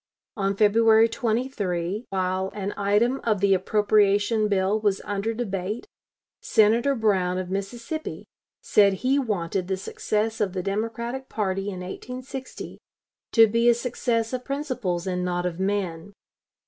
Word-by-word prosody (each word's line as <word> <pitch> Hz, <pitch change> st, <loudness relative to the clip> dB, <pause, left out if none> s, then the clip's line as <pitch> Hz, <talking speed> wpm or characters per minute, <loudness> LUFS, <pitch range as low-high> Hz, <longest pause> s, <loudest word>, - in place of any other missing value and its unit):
On 195 Hz, -1 st, 0 dB
February 220 Hz, +2 st, +5 dB
23, 220 Hz, -5 st, -2 dB
while 190 Hz, 0 st, -1 dB
an 200 Hz, -1 st, -3 dB
item 210 Hz, +6 st, +1 dB
of 215 Hz, -4 st, +1 dB
the 200 Hz, 0 st, +4 dB
appropriation 205 Hz, +2 st, +2 dB
bill 200 Hz, +1 st, +1 dB
was 205 Hz, -2 st, +1 dB
under 205 Hz, +2 st, -2 dB
debate, 210 Hz, -, -3 dB, 0.6 s
Senator 230 Hz, +6 st, +3 dB
Brown, 190 Hz, -6 st, +1 dB
of 185 Hz, 0 st, -4 dB
Mississippi, 230 Hz, +11 st, -5 dB, 0.4 s
said 200 Hz, -2 st, +4 dB
he 270 Hz, +2 st, +3 dB
wanted 190 Hz, -6 st, -2 dB
the 190 Hz, 0 st, -1 dB
success 215 Hz, +3 st, -2 dB
of 195 Hz, -3 st, 0 dB
the 185 Hz, -2 st, -3 dB
Democratic 230 Hz, +6 st, -3 dB
party 195 Hz, -2 st, -2 dB
in 185 Hz, -2 st, -6 dB
1860 255 Hz, +7 st, -7 dB, 0.5 s
to 225 Hz, -1 st, +7 dB
be 230 Hz, +2 st, +3 dB
a 235 Hz, -, +5 dB
success 235 Hz, -1 st, -1 dB
of 250 Hz, 0 st, -3 dB
principles 255 Hz, -, -3 dB
and 180 Hz, -1 st, -2 dB
not 175 Hz, 0 st, -1 dB
of 180 Hz, -1 st, -3 dB
men. 190 Hz, -2 st, -2 dB
205 Hz, 135 wpm, -25 LUFS, 190-230 Hz, 0.6 s, to